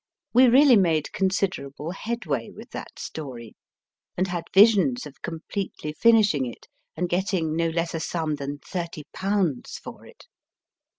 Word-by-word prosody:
We 255 +2 +7
really 260 0 +7
made 165 -6 +2
considerable 185 -6 -1
headway 190 - -3
with - - -12
that - - -8
story; 125 -7 -7 0.6
and 185 +1 0
had 175 -1 -3
visions 190 - +5
of 145 -2 -12
completely 165 -1 -5
finishing 205 - +4
it 120 - -10 0.3
and 180 +2 0
getting 175 -3 0
no 165 0 +1
less 165 +1 -2
a 165 - -2
sum 160 -2 -2
than 140 +1 -5
thirty 170 0 -5
pounds 190 -8 -1
for - - -11
it. - - -17
170 Hz, 140 wpm, -25 LUFS, 150-195 Hz, 0.6 s, We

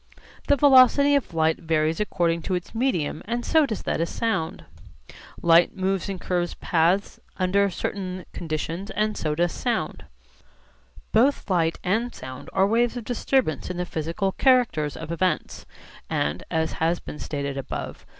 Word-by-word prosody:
The 285 - +5
velocity 280 +1 +6
of 280 -7 +1
light 160 0 +2
varies 160 -1 0
according 170 -5 0
to 185 - +1
its 180 - -5
medium 225 - -1
and 240 +2 -3
so 315 -3 +4
does 220 -5 -4
that - - -1
of 165 - -1
sound. 220 - -2 0.8
Light 170 +3 +5
moves 190 +1 -1
in 195 - -3
curved 175 -1 -2
paths 175 +4 +1 0.2
under 200 +2 +2
certain 185 -1 -4
conditions 165 +3 -4
and 215 0 -1
so 150 -1 -2
does 175 +2 +1
sound. 240 -2 -2 1.1
Both 240 -1 +2
light 165 -2 +2
and 225 +7 0
sound 130 0 -9
are 190 0 +3
waves 235 +4 +1
of 240 - -5
disturbance 245 - 0
in 180 - -4
the 180 - -1
physical 170 +4 -2
characters 235 - +2
of 160 0 -7
events; 180 +2 -1 0.4
and 75 - -1
(as 160 0 0
has 165 +2 +2
been 150 - -9
stated 140 -2 -4
above, 135 -2 -5
p. - - -23
180 Hz, 160 wpm, -24 LUFS, 165-225 Hz, 1.1 s, velocity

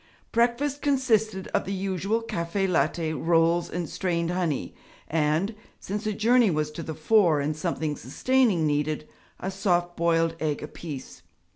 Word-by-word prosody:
Breakfast 245 +5 +1
consisted 220 -8 +1
of - - 0
the 195 - -4
usual 195 +3 -1
caffè 190 -1 -1
latte, 165 -2 +1
rolls 165 +3 +2
and 175 -1 -3
strained 170 -1 -1
honey, 175 -6 -1 0.3
and 160 +6 +1 0.3
since 210 +2 -4
a 215 - 0
journey 230 +2 +4
was 155 -2 -1
to 160 - -6
the 160 -1 -5
fore 170 -3 +4
and 150 +2 -1
something 155 -2 -2
sustaining 205 - +1
needed 150 +1 0 0.3
a 190 - -3
soft 175 -3 0
boiled 165 -1 +2
egg 150 -2 -1
apiece. 150 - -8
175 Hz, 145 wpm, -26 LUFS, 155-210 Hz, 0.3 s, journey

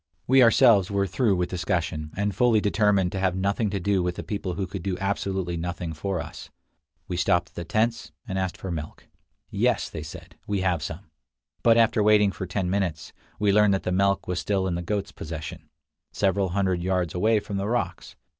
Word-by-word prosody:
We 130 +1 +5
ourselves 115 -5 +6
were 100 -1 +1
through 105 +2 +1
with 90 -1 -1
discussion, 85 -3 -2
and 100 0 0
fully 115 +2 +3
determined 100 -3 +2
to 95 - -3
have 95 -1 +1
nothing 100 +3 0
to 100 0 -2
do 95 +1 +1
with 90 0 -2
a - - -4
people 100 -4 -4
who 100 - -2
could 95 0 -6
do 90 0 -2
absolutely 95 -2 -2
nothing 85 0 -4
for 95 +3 -3
us. - - -8 0.6
We 90 - -3
stopped 85 0 +2
at - - -33
the 85 - -6
tents, 115 +6 0 0.2
and 95 0 -2
asked 95 -2 -2
for 95 - -6
milk. 80 -2 -6 0.5
"Yes," - - +1
they 80 - -5
said; 75 - -11
"we 100 -2 -1
have 90 -4 +1
some": 80 +2 -7 0.5
but 115 -1 +5
after 115 -1 +4
waiting 105 -1 +5
for 95 +1 -6
ten 90 +1 -2
minutes, 90 -5 -2 0.2
we 105 -1 +2
learned 105 -1 +5
that 95 - -3
the 90 - -1
milk 100 +1 +1
was 90 -1 -1
still 95 -1 0
in 95 - -1
the 85 - -2
goats' 100 +3 -3
possession, 80 -2 -7 0.4
several 95 -1 +1
hundred 95 -1 0
yards 90 -2 0
away 110 +5 +2
among 100 -1 -5
the 100 - -2
rocks. 120 +1 -3
95 Hz, 205 wpm, -25 LUFS, 90-100 Hz, 0.6 s, ourselves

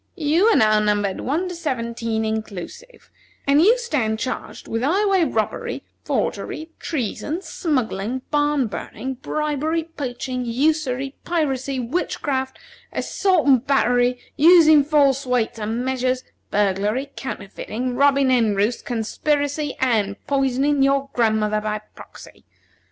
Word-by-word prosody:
You 325 +4 +2
are 455 - +5
now 215 -3 +4
numbered 205 -2 0
One 320 +8 -1
to 360 - -5
Seventeen 230 -8 -2
inclusive, 220 - -6 0.3
and 285 +2 +4
you 445 +8 +5
stand 265 - -1
charged 255 - -5
with 225 - -2
highway 380 +5 +2
robbery, 220 -7 -2 0.2
forgery, 320 +1 -3
treason, 305 - -3
smuggling, 255 - -2
barn 290 -2 +2
burning, 255 +4 -5
bribery, 305 +2 -1
poaching, 255 -5 -4
usury, 270 +1 0
piracy, 275 -5 -1
witchcraft, 265 0 -2 0.3
assault 375 -5 +1
and 265 -3 +4
battery, 245 -2 +3 0.2
using 315 -2 +7
false 280 -2 +3
weights 240 -2 0
and 225 +4 -2
measures, 255 0 0 0.3
burglary, 210 +7 0
counterfeiting, 245 +1 -5
robbing 275 0 +4
hen 225 -5 +3
roosts, 210 +4 0
conspiracy, 285 +5 -1
and 215 -6 +1
poisoning 275 +1 +1
your 275 0 +2
grandmother 215 -2 +1
by 215 0 -2
proxy. - - -14
265 Hz, 120 wpm, -22 LUFS, 230-300 Hz, 0.3 s, using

